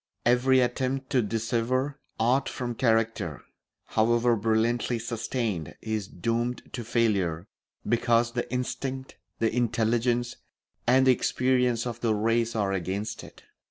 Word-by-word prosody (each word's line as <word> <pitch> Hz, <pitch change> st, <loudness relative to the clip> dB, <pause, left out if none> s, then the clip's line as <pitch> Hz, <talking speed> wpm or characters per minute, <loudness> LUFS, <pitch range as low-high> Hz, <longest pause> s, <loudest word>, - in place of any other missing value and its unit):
Every 125 Hz, +2 st, +4 dB
attempt 130 Hz, +2 st, -1 dB
to 130 Hz, -3 st, +4 dB
dissever 115 Hz, +5 st, -1 dB, 0.2 s
art 125 Hz, +4 st, +2 dB
from 120 Hz, -1 st, -4 dB
character, 115 Hz, -1 st, 0 dB, 0.4 s
however 120 Hz, +2 st, +2 dB
brilliantly 115 Hz, +2 st, +1 dB
sustained, 115 Hz, -, -3 dB
is 110 Hz, -3 st, -3 dB
doomed 115 Hz, +7 st, -2 dB
to 120 Hz, -, -4 dB
failure 100 Hz, -8 st, 0 dB, 0.4 s
because 120 Hz, 0 st, +2 dB
the 120 Hz, 0 st, -3 dB
instinct, 130 Hz, +1 st, -4 dB, 0.2 s
the 115 Hz, 0 st, 0 dB
intelligence, 120 Hz, +1 st, +1 dB, 0.5 s
and 130 Hz, +2 st, +5 dB
the 130 Hz, -, +7 dB
experience 125 Hz, -1 st, +1 dB
of 120 Hz, -1 st, -5 dB
the 110 Hz, -2 st, +2 dB
race 115 Hz, +2 st, +1 dB
are 100 Hz, -3 st, +1 dB
against 95 Hz, +4 st, -3 dB
it. -, -, -14 dB
120 Hz, 125 wpm, -27 LUFS, 110-125 Hz, 0.5 s, the